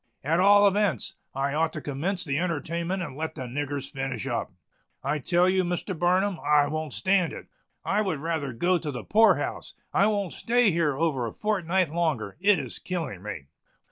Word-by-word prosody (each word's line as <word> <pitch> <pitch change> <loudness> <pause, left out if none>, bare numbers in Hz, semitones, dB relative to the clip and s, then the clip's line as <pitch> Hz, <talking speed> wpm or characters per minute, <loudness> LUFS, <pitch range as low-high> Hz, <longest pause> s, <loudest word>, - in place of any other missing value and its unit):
At 160 +5 +1
all 205 +2 +7
events, 200 - +1 0.2
I 140 +1 -1
ought 160 +1 +1
to - - -4
commence 170 +7 -2
the 140 -1 -1
entertainment 170 +2 -2
and 145 -6 -7
let 160 +2 -4
the - - -5
niggers 140 +2 -4
finish 135 -5 -4
up. - - -2 0.5
I 145 +3 0
tell 175 +6 +2
you, 185 0 +3
Mr. 175 +2 -3
Barnum, 180 +3 +1
I 145 0 +4
won't 155 -1 -3
stand 190 -3 +1
it! - - -8 0.4
I 205 +2 +2
would 185 -8 -1
rather 155 -3 -2
go 175 +9 +1
to 155 - -5
the 125 -4 -5
poor 215 -3 +5
house. 145 - -5 0.2
I 200 - +4
won't 200 -5 -1
stay 240 -2 +2
here 155 -5 +1
over 140 -7 0
a - - -5
fortnight 185 - 0
longer! 155 -12 -1
It 200 +1 +4
is - - -5
killing 165 - -4
me!" 95 -8 -6
165 Hz, 190 wpm, -26 LUFS, 145-190 Hz, 0.5 s, all